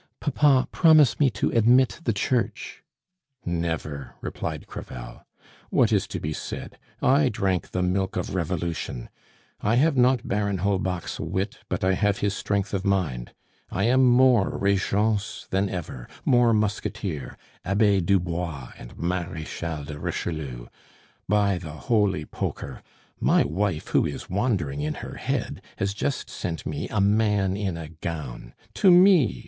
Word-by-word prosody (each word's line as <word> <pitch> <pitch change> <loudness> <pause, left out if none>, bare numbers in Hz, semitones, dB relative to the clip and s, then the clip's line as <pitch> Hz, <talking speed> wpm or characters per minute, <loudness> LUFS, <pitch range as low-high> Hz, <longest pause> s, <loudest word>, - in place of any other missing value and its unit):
"Papa, 140 -2 +3
promise 155 -6 +5
me 145 -3 +5
to 100 -5 -1
admit 120 +5 +4
the 115 - +3
Church 115 +4 -2 0.3
" 140 -8 -44 0.2
"Never," 75 -4 -5
replied - - -5
Crevel. - - -9 0.4
"What - - +3
is - - +2
to - - -4
be 75 +1 -3
said? - - -7 0.2
I 135 +2 +4
drank 95 -4 -1
the 90 - -1
milk 95 +1 0
of - - -3
Revolution; 85 -7 -3 0.5
I 110 +3 +2
have 145 +4 +3
not 125 -1 +3
Baron 100 -1 0
Holbach's 95 -2 -1
wit, 95 +2 -3
but - - -2
I 95 0 +3
have 105 +1 +1
his 100 -1 0
strength 100 -1 -1
of 95 -1 -1
mind. 90 - -1 0.3
I 95 - -1
am 130 +4 +4
more 125 -4 +4
Regence 100 +2 0
than 95 +1 +1
ever, 75 -9 -6 0.2
more 120 -2 +4
Musketeer, 105 - -2 0.3
Abbe 100 +1 +3
Dubois, 85 -7 -1
and - - -11
Marechal 85 -2 -3
de 75 0 -7
Richelieu! 70 -10 -4 0.6
By 100 -3 +2
the 80 -4 -8
Holy 100 -4 +1
Poker! - - -5 0.4
My - - +4
wife, 85 +2 -2
who - - +3
is 70 - -7
wandering 90 - 0
in 75 +1 -2
her - - -8
head, - - -3 0.2
has 100 0 -1
just 135 +7 -2
sent 85 -2 -5
me 75 -1 -4
a 110 - -1
man 100 -1 +2
in 100 -4 -2
a 80 -2 -7
gown 75 -7 -6 0.2
to 195 - +4
me! 180 - +6
100 Hz, 145 wpm, -25 LUFS, 85-110 Hz, 0.6 s, me